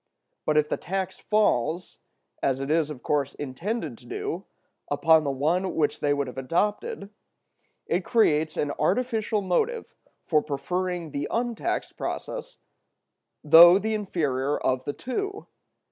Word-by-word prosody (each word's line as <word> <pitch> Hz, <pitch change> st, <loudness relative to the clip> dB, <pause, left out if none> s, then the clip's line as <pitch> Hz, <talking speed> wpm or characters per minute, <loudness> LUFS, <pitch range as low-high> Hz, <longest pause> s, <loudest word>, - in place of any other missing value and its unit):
But 155 Hz, -, +3 dB
if 150 Hz, 0 st, +3 dB
the -, -, -1 dB
tax 190 Hz, 0 st, -4 dB
falls, 175 Hz, -, 0 dB, 0.4 s
as 135 Hz, -1 st, +1 dB
it 135 Hz, +2 st, -3 dB
is 160 Hz, -1 st, +2 dB
of 140 Hz, -5 st, -8 dB
course 140 Hz, -2 st, 0 dB
intended 205 Hz, -, -4 dB
to -, -, -17 dB
do, 415 Hz, +2 st, -4 dB, 0.4 s
upon 160 Hz, -2 st, +4 dB
the 145 Hz, -, -1 dB
one 160 Hz, +8 st, 0 dB
which 150 Hz, -2 st, +1 dB
they 145 Hz, -, +1 dB
would 140 Hz, -1 st, +1 dB
have 130 Hz, +1 st, -7 dB
adopted, 200 Hz, +7 st, -1 dB, 0.7 s
it -, -, 0 dB
creates 155 Hz, -9 st, +2 dB
an 145 Hz, -, 0 dB
artificial 215 Hz, +4 st, 0 dB
motive 440 Hz, -, -1 dB, 0.3 s
for 155 Hz, -3 st, +3 dB
preferring 175 Hz, +3 st, -3 dB
the 145 Hz, 0 st, -3 dB
untaxed 235 Hz, -1 st, -2 dB
process, -, -, -5 dB, 0.9 s
though 170 Hz, +4 st, +9 dB
the 220 Hz, +2 st, -1 dB
inferior 145 Hz, -9 st, -1 dB
of 130 Hz, 0 st, -1 dB
the 145 Hz, -, -2 dB
two. 400 Hz, -, -4 dB
170 Hz, 140 wpm, -26 LUFS, 145-215 Hz, 0.9 s, though